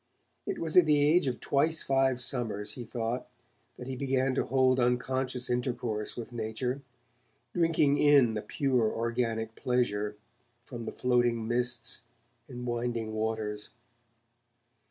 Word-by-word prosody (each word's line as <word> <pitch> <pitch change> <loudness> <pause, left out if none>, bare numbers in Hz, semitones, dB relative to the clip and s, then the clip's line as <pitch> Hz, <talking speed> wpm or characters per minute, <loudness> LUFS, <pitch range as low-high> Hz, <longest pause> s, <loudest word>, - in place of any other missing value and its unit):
It - - -2
was 160 -2 -3
at 180 -3 +7
the 150 -1 +4
age 150 +2 +4
of 125 - -2
twice 155 +3 +1
five 135 -2 +2
summers, 110 -5 -2
he 125 - -6
thought, 115 +1 -3 0.5
that 125 - -8
he 130 +1 -4
began 130 0 +1
to 135 - +1
hold 130 -1 +3
unconscious 125 +1 0
intercourse 120 -3 -2
with 120 0 -7
nature, 120 +4 -3 0.7
'drinking 160 -4 +3
in 140 -6 +5
a 105 - -2
pure 125 -5 +1
organic 115 -1 -1
pleasure' 105 -5 0 0.5
from 120 -2 -7
the - - -4
floating 120 -2 +1
mists 120 0 -1 0.5
and 125 -2 -7
winding 120 -2 -2
waters. 110 -1 -3
125 Hz, 135 wpm, -30 LUFS, 115-130 Hz, 0.7 s, at